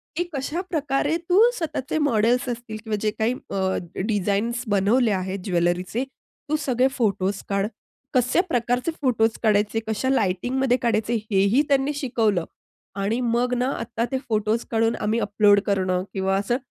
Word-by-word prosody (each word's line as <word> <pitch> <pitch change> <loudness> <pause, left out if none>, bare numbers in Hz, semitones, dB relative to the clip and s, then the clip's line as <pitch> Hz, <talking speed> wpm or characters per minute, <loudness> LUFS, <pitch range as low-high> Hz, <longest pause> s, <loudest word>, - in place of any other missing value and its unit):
की 350 - +1
कशाप्रकारे 295 0 -1
तू 360 +2 +5 0.2
स्वतःचे 310 -3 -3
मॉडेल्स 245 -2 +2
असतील 235 -2 -5
किंवा 220 -2 -2
जे 215 -1 +1
काही 220 +3 0 0.2
अ, 190 -1 0 0.2
डिझाईन्स 210 +3 0
बनवले 215 +4 +3
आहेत 190 0 -2
ज्वेलरीचे. 180 +5 0 0.5
तू 305 - +2
सगळे 260 -3 +2
फोटोज 200 -4 0
काढ 200 0 +1 0.5
कशा 250 +6 +3
प्रकारचे 245 +4 0
फोटो 245 -5 +3 0.2
काढायचे, 210 0 +2
कशा 220 +4 -1
लाइटिंगमध्ये 250 +3 +1
काढायचे 230 -1 +1 0.2
हेही 200 +7 +4
त्यांनी 275 +1 +2
शिकवलं. 225 - 0 0.5
आणि 200 +4 -1
मग 240 +2 +1
ना 250 +1 +1
आत्ता 230 0 -3
ते 265 - +1
फोटोज 220 +1 +1
काढून 225 0 +2
आम्ही 215 +2 0
अपलोड 205 -1 +4
करणं 185 -2 0
किंवा 195 0 0
असं, 205 +5 0
225 Hz, 145 wpm, -24 LUFS, 200-255 Hz, 0.5 s, तू